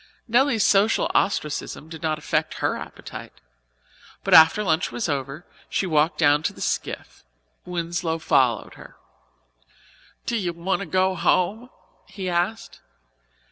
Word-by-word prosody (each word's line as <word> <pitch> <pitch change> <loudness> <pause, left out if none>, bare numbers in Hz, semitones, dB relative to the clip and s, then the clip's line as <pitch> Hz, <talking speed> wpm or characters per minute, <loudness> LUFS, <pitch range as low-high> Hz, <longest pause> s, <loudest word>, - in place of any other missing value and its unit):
Nelly's 240 -1 +3
social 205 +2 +3
ostracism 155 -5 -1
did 160 -1 -10
not 155 -2 -1
affect 155 - -1
her - - -1
appetite. - - -10 0.8
But - - 0
after 160 +6 +7
lunch 165 -3 0
was 230 - -2
over, 140 +2 -4 0.2
she - - 0
walked 155 -1 +1
down 145 -2 +4
to 160 - -2
the - - -15
skiff. - - -4 0.4
Winslow 170 -1 -2
followed 130 -8 +1
her. - - -14 1.3
"Do 235 - -1
you 180 -5 -2
want 170 +3 -2
to 200 - -5
go 185 +2 +2
home?" 205 +7 0 0.4
he 190 0 -6
asked. 180 +5 -2
175 Hz, 135 wpm, -23 LUFS, 155-195 Hz, 1.3 s, after